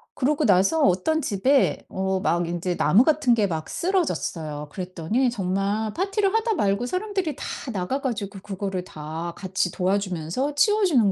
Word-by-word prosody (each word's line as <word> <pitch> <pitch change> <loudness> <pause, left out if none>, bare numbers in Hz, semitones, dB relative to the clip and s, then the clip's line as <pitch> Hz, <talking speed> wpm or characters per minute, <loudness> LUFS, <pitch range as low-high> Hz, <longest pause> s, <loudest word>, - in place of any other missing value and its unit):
그러고 290 +3 +1
나서 195 - +4
어떤 195 - +2
집에 260 +4 +2
어 190 0 -1
막 175 -1 +1
인제 175 +1 -2
나무 190 - +5
같은 300 -5 +3
게 215 -3 +2
막 160 -3 -4
쓰러졌어요. 165 - -2
그랬더니 185 - -1
정말 200 +1 -1
파티를 390 +1 0
하다 450 0 +2
말고 200 -2 +1
사람들이 370 -1 -2
다 - - -8 0.3
나가 200 +7 -2
가지고 210 -6 -3
그거를 195 -2 -4
다 160 +1 -6
같이 185 -1 -1
도와주면서 190 - -1
치워 415 +6 +4
주는 240 - +4
200 Hz, 335 characters per minute, -24 LUFS, 180-290 Hz, 0.3 s, 나무